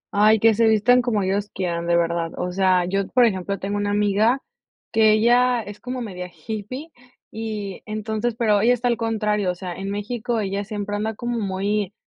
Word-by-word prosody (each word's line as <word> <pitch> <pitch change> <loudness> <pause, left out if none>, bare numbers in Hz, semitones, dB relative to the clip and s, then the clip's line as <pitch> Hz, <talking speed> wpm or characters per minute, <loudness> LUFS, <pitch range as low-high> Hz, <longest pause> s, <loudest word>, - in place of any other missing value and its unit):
Ay, 215 +2 +5
que 225 +1 +5
se 225 +2 +3
vistan 220 +3 +4
como 220 -5 0
ellos 200 +2 -1
quieran, 170 -2 -3
de 170 0 +3
verdad. 170 -1 -1
O 180 - -2
sea, 185 -1 +2
yo, 195 +1 -1
por 250 -2 +4
ejemplo, 200 -2 -1
tengo 200 +2 -3
una 205 0 -1
amiga 210 +5 +2 0.5
que 220 -1 +5
ella 240 +2 +4
es 205 0 -10
como 255 0 -5
media 180 -5 -6
hippie, 220 - -7 0.4
y 215 -3 -5
entonces 215 +2 -2
pero 210 -4 +3
ella 240 +3 +4
está 245 +1 -1
al 235 - +1
contrario, 210 -4 0
o 180 - -1
sea, 180 -1 -6
en 195 +1 -5
México 220 +3 -2
ella 200 -1 -2
siempre 205 -1 -4
anda 215 +1 -2
como 240 +1 -3
muy 200 0 -1
210 Hz, 195 wpm, -22 LUFS, 195-225 Hz, 0.5 s, Ay